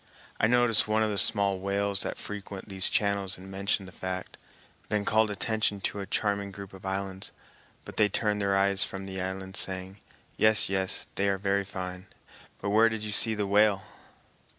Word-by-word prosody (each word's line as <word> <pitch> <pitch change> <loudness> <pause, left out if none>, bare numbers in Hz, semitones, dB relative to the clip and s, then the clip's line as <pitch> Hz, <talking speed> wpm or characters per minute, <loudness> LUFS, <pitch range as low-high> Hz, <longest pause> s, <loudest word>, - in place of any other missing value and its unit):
I 105 - +4
noticed 120 -2 +3
one 110 +1 +2
of 110 - 0
the 100 - -2
small 100 -3 +4
whales 100 +1 +1
that - - -3
frequent 100 -1 -7
these 95 -2 +1
channels 100 -2 0
and 95 +1 -11
mentioned 100 0 -1
the - - -11
fact, 95 0 -6 0.5
then 105 -1 0
called 110 0 +3
attention 105 0 -1
to 100 - -3
a 100 - -5
charming 100 -1 -1
group 100 0 -10
of 95 0 -9
islands, 95 0 -4 0.6
but - - -10
they 105 -1 +4
turned 105 0 0
their 100 -1 +1
eyes 100 0 +4
from 95 0 -5
the 95 -1 -5
islands, 95 +2 -4
saying, 95 +1 -1 0.4
"Yes, 110 -2 +4
yes, 95 -1 -2
they 100 +1 0
are 100 - 0
very 100 0 0
fine, 95 -1 -7 0.5
but 100 - -3
where 110 +2 +5
did 110 -1 -5
you 105 - -4
see 110 +2 +5
the 105 -1 -1
whale?" 100 -1 +3
100 Hz, 190 wpm, -28 LUFS, 95-105 Hz, 0.6 s, where